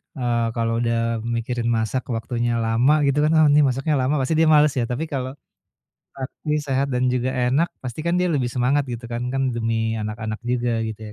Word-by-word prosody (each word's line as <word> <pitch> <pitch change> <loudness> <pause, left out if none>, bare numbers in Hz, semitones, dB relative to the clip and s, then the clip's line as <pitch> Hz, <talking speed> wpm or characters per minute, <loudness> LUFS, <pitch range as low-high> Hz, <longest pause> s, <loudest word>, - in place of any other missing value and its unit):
eee, 120 -3 0
kalau 115 0 0
udah 115 -1 0 0.2
mikirin 115 0 -2
masak 110 +4 -1
waktunya 120 +1 -2
lama, 115 +6 +3
gitu 140 +1 +1
kan. 155 - +3
"Oh 155 -1 +6
ini 145 - +5
masaknya 135 +4 0
lama." 130 +4 +1
Pasti 130 +4 0
dia 160 - +4
males 150 0 +5
ya. - - +1
Tapi 125 +6 -2
kalau, 130 -1 -2 0.8
praktis, 150 +3 -3
sehat, 135 +1 +1
dan 125 - 0
juga 125 +1 0
enak 130 +6 +1
pasti 130 +3 -6
kan 170 - +1
dia 180 - +2
lebih 125 -4 0
semangat, 130 +4 +1
gitu 120 0 -5
kan. 120 - -3
Kan 135 - 0
demi 115 -1 -1
anak-anak 110 +1 -4
juga 120 -2 0
gitu 110 0 -6
125 Hz, 195 wpm, -22 LUFS, 115-135 Hz, 0.8 s, Oh